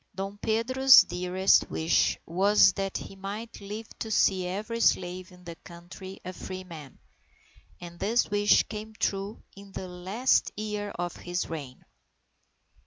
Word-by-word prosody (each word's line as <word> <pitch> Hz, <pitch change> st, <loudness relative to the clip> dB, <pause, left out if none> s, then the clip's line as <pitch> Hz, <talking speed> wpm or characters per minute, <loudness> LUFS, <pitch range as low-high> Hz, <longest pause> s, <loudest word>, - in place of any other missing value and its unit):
Dom 195 Hz, +2 st, -5 dB
Pedro's 255 Hz, +5 st, +6 dB
dearest 180 Hz, +2 st, +2 dB
wish 160 Hz, +1 st, +1 dB
was 190 Hz, +3 st, +4 dB
that 195 Hz, -1 st, -3 dB
he 195 Hz, -, -9 dB
might 205 Hz, +4 st, -7 dB
live 210 Hz, +3 st, -7 dB
to 225 Hz, -, -4 dB
see 190 Hz, -4 st, +2 dB
every 215 Hz, +5 st, -4 dB
slave 185 Hz, -3 st, +1 dB
in 180 Hz, 0 st, -17 dB
the 170 Hz, -1 st, -7 dB
country 175 Hz, +2 st, -11 dB
a 185 Hz, -, -5 dB
free 185 Hz, +1 st, -7 dB
man, 155 Hz, -7 st, -11 dB, 0.8 s
and 175 Hz, -1 st, -10 dB
this 220 Hz, +2 st, +1 dB
wish 205 Hz, 0 st, +4 dB
came 215 Hz, 0 st, -8 dB
true 200 Hz, +2 st, -2 dB
in 200 Hz, 0 st, -13 dB
the 185 Hz, -, -6 dB
last 190 Hz, +8 st, 0 dB
year 210 Hz, -1 st, -4 dB
of 175 Hz, 0 st, -3 dB
his 175 Hz, -1 st, -4 dB
reign. 140 Hz, -6 st, -7 dB
195 Hz, 145 wpm, -28 LUFS, 180-210 Hz, 0.8 s, Pedro's